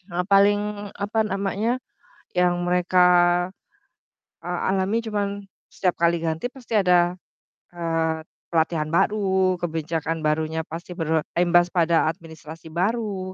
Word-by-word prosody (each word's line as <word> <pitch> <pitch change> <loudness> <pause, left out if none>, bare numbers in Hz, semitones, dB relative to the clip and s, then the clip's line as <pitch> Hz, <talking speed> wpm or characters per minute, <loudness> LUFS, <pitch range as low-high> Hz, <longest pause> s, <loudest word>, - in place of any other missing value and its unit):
eee, 180 - +1
paling, 200 +1 +5 0.4
apa 205 +2 -2
namanya, 200 +4 -1 0.6
yang 175 0 +2
mereka, 180 +1 +2 1.4
eee, 175 0 -3
alami 190 +4 +1
cuman 210 -3 -2 0.4
setiap 180 -2 0
kali 170 0 +2
ganti 165 +9 -2
pasti 245 -4 -6
ada, 180 -3 +3 0.6
eee, 165 -2 -1 0.3
pelatihan 160 -1 +1
baru, 190 -2 +2
kebijakan 165 -1 -3
barunya 155 +1 0
pasti 170 +3 -8
berimbas 175 +1 +1
pada 170 -2 +3
administrasi 160 -1 -7
baru 190 +1 -2
175 Hz, 110 wpm, -23 LUFS, 165-195 Hz, 1.4 s, paling